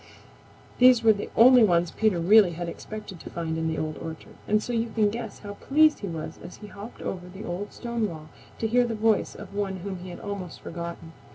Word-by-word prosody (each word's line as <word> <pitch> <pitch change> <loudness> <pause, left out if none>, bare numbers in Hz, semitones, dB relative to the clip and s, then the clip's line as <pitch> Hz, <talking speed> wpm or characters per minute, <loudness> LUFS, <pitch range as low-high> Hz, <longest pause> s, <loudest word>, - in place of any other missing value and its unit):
These 250 -2 +7
were 220 -1 +7
the 205 - -6
only 245 +1 +8
ones 175 -4 +3
Peter 215 -4 +1
really 190 +1 +6
had 175 +1 -5
expected 200 +1 -8
to - - -9
find 165 -1 -3
in 160 0 -1
the 160 -1 -2
Old 155 -1 -3
Orchard, 160 -1 -8
and 215 0 +2
so 245 - -4
you 230 0 0
can 215 -2 +1
guess 225 -2 -6
how 205 -1 -8
pleased 305 +7 +3
he 200 - -5
was 160 -3 -6
as - - -9
he 210 - -12
hopped 210 +2 -10
over 180 -1 -5
the 190 +3 -9
old 185 +4 -4
stone 235 -3 -2
wall 155 -2 -10 0.3
to 225 - -1
hear 245 +3 +3
the 230 - -3
voice 220 -1 +1
of - - -10
one 200 -1 -2
whom 190 -1 -5
he 180 +1 -9
had 175 - -8
almost 200 -4 -6
forgotten. 170 -1 -7
200 Hz, 225 wpm, -26 LUFS, 175-225 Hz, 0.3 s, only